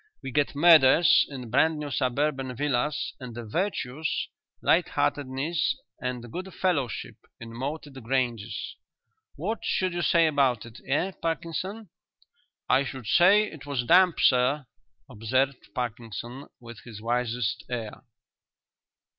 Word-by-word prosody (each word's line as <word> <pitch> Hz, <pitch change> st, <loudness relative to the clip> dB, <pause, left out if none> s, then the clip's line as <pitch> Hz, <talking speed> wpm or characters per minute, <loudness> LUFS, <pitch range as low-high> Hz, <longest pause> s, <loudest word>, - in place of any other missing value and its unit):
We 135 Hz, -, -5 dB
get 145 Hz, +1 st, 0 dB
murders 160 Hz, 0 st, +6 dB
in 125 Hz, -5 st, -8 dB
brand 155 Hz, +5 st, +3 dB
new 150 Hz, -1 st, -5 dB
suburban 135 Hz, 0 st, -1 dB
villas 145 Hz, +2 st, -1 dB
and 125 Hz, -3 st, -8 dB
the 120 Hz, -1 st, -6 dB
virtues, 155 Hz, -, -2 dB, 0.3 s
light -, -, +3 dB
heartedness 145 Hz, +4 st, 0 dB, 0.3 s
and 125 Hz, -2 st, -4 dB
good 185 Hz, +2 st, -6 dB
fellowship, 145 Hz, -, -1 dB, 0.2 s
in 115 Hz, 0 st, -9 dB
moated 135 Hz, +1 st, -6 dB
granges. 115 Hz, -4 st, -2 dB, 0.6 s
What 205 Hz, +10 st, -3 dB
should 185 Hz, -2 st, 0 dB
you 175 Hz, -, -2 dB
say 170 Hz, -1 st, +4 dB
about 135 Hz, -7 st, +2 dB
it, 115 Hz, +1 st, -12 dB
eh, 145 Hz, +8 st, +1 dB
Parkinson?" 170 Hz, +5 st, -3 dB, 0.8 s
"I 130 Hz, +2 st, +4 dB
should 130 Hz, -2 st, -7 dB
say 185 Hz, -, +5 dB
it 155 Hz, -8 st, -8 dB
was 140 Hz, -4 st, -1 dB
damp, 180 Hz, +5 st, +5 dB
sir," 130 Hz, +3 st, +3 dB, 0.4 s
observed 130 Hz, +1 st, -1 dB
Parkinson, 120 Hz, +2 st, -5 dB
with 120 Hz, -2 st, -11 dB
his 110 Hz, -2 st, -11 dB
wisest 120 Hz, -1 st, -1 dB
air. 115 Hz, -4 st, -5 dB
135 Hz, 125 wpm, -27 LUFS, 120-160 Hz, 0.8 s, murders